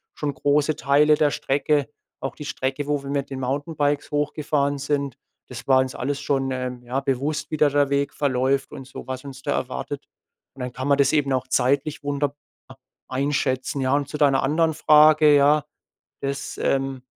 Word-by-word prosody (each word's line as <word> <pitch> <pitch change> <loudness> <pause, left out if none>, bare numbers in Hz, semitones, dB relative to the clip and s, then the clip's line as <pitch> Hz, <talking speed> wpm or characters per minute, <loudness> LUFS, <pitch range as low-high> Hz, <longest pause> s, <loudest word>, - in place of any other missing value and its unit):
schon 145 -1 -2
große 145 +3 +1
Teile 150 +1 +4
der 150 -1 +2
Strecke, 145 +1 0 0.3
auch 135 - -5
die 150 - -8
Strecke, 135 +1 -3
wo 145 -1 0
wir 140 - -7
mit 140 -1 -2
den 135 - -4
Mountainbikes 145 +3 -1
hochgefahren 145 -1 0
sind. 140 -2 -2 0.3
Das - - -9
war 130 -1 +5
uns 130 0 -4
alles 140 +1 -3
schon, 135 -1 0
ähm, 125 -1 -4
ja, 125 +3 -2
bewusst, 145 +3 -2
wie 155 - -2
da 150 - +5
der 145 0 +2
Weg 140 0 0
verläuft 135 -1 0
und 135 -3 -8
so 130 - -10
was 130 0 -5
uns 135 -1 -9
da - - -1
erwartet. - - -4 0.5
Und - - -15
dann 125 0 -4
kann 130 +2 -4
man 140 -1 +4
das 140 +1 +3
eben 140 -3 +2
auch 130 0 -1
zeitlich 140 +4 0
wunderbar 145 0 -2 0.7
einschätzen, 135 0 -1
ja. 130 +1 +1
Und 145 -1 -1
zu 150 - -5
deiner 140 -3 +3
anderen 160 +3 +2
Frage, 155 -1 +6
ja, 145 +1 +4 0.6
das, 140 0 -4
ähm 135 -1 0
140 Hz, 185 wpm, -23 LUFS, 135-145 Hz, 0.7 s, Frage